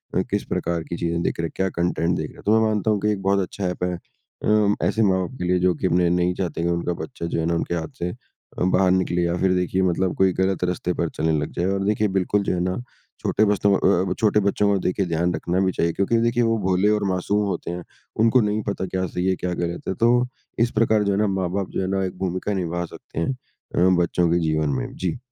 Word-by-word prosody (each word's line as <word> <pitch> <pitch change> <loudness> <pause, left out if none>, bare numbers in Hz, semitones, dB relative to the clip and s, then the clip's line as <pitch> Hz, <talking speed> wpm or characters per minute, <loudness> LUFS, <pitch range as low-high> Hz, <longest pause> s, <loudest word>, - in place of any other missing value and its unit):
अ, - - +3
किस - - 0
प्रकार 85 -1 -2
की 85 - -5
चीज़ें 85 0 -1
देख - - -2
रहा, 85 -1 -1
क्या 95 0 0
कंटेंट 85 0 0
देख 75 -1 -4
रहा - - -14
तो 110 +2 +4
मैं 110 - +3
मानता 110 0 +1
हूँ 105 - +1
कि 105 - +2
एक 100 -2 -3
बहुत 100 +1 +2
अच्छा 95 +1 -3
एप 90 0 -3
है। 90 0 0
अ, 105 +4 -1
ऐसे 105 +4 +1
माँ-बाप 95 +5 0
के - - -4
लिए 90 0 +2
जो 90 0 +3
कि 95 - -1
अपने 90 0 +3
नहीं 90 +1 +2
चाहते 85 -4 -3
कि - - +1
उनका 85 0 -1
बच्चा 85 - -7
जो 85 - -2
है 80 - 0
ना 85 0 +1
उनके 85 +1 -1
हाथ 80 -2 -5
से 85 - -1 0.5
अ, - - 0
बाहर 95 0 +3
निकले 90 -1 +1
या 85 0 0
फिर 95 0 +2
देखिए 90 +1 0
मतलब 95 0 +1
कोई 95 -1 +3
गलत 95 0 0
रस्ते 90 0 -1
पर 85 -1 -1
चलने 80 +1 -1
लग 75 - -3
जाए 85 - -1
और 95 +1 0
देखिए 105 +1 +2
बिल्कुल 100 +2 +1
जो - - 0
है 90 - -1
ना 90 0 -1 0.4
छोटे 110 - +2
बस्तों 100 0 +2
को - - +1 0.2
अ - - -3
अ, - - +3
छोटे 105 -1 +3
बच्चों 100 0 +2
का 100 - +3
देखिए 95 +1 0
ध्यान 85 +1 0
रखना 90 +2 -1
भी 95 - +2
चाहिए 85 -1 0
क्योंकि 100 +6 +1
देखिए 120 +1 +2
वो 115 0 +2
भोले 95 +2 +3
और 105 -1 +1
मासूम 100 +3 0
होते 95 - -3
हैं। 90 0 -5 0.4
उनको 115 +2 +5
नहीं 105 0 0
पता 100 -1 -2
क्या 95 0 -2
सही 90 +1 -3
है 95 - +2
क्या 90 0 -3
गलत 85 0 -4
है। - - 0
तो 115 +1 +5 0.5
इस 120 +1 +3
प्रकार 110 -2 +3
जो 100 - +1
है - - 0
ना 105 - +2
माँ-बाप 95 0 -1
जो - - -2
है 95 - -1
ना 95 - 0
एक 90 - -6
भूमिका 95 +2 -2
निभा 85 -2 -2
सकते 80 - -9
हैं 85 - 0 0.4
अ, 90 +2 +4
बच्चों 85 0 +1
के 85 - +3
जीवन 80 -2 0
में। - - -6
जी। 90 +2 -2
95 Hz, 265 wpm, -23 LUFS, 85-100 Hz, 0.5 s, उनको